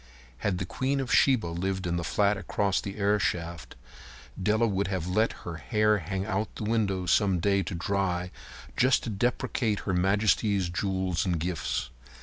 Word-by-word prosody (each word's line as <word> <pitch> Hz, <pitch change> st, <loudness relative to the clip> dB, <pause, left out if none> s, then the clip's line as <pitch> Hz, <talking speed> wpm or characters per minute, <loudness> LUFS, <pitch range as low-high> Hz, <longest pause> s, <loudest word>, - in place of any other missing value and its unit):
Had 95 Hz, -3 st, 0 dB
the 95 Hz, -, -3 dB
queen 135 Hz, +9 st, -1 dB
of 130 Hz, -2 st, -1 dB
Sheba 130 Hz, -7 st, +4 dB
lived 95 Hz, +3 st, -2 dB
in 85 Hz, 0 st, -1 dB
the 85 Hz, -, -2 dB
flat 100 Hz, +5 st, +2 dB
across 100 Hz, -1 st, 0 dB
the 100 Hz, -, -6 dB
airshaft, 90 Hz, -5 st, -1 dB, 0.7 s
Della 110 Hz, +4 st, +2 dB
would 100 Hz, -2 st, 0 dB
have 95 Hz, -4 st, -2 dB
let 105 Hz, +5 st, +2 dB
her 85 Hz, -2 st, -5 dB
hair 105 Hz, +3 st, +2 dB
hang 95 Hz, +3 st, -3 dB
out 105 Hz, 0 st, -2 dB
the -, -, -5 dB
window 105 Hz, -4 st, 0 dB
some 95 Hz, +2 st, +3 dB
day 100 Hz, +2 st, +2 dB
to 90 Hz, 0 st, -4 dB
dry 90 Hz, 0 st, -1 dB, 0.4 s
just 130 Hz, +1 st, +3 dB
to 115 Hz, -, -3 dB
depreciate 110 Hz, 0 st, 0 dB
Her 95 Hz, -, -2 dB
Majesty's 100 Hz, 0 st, +2 dB
jewels 95 Hz, -1 st, -1 dB
and 90 Hz, -3 st, 0 dB
gifts. 85 Hz, 0 st, -2 dB
95 Hz, 165 wpm, -28 LUFS, 90-105 Hz, 0.7 s, Sheba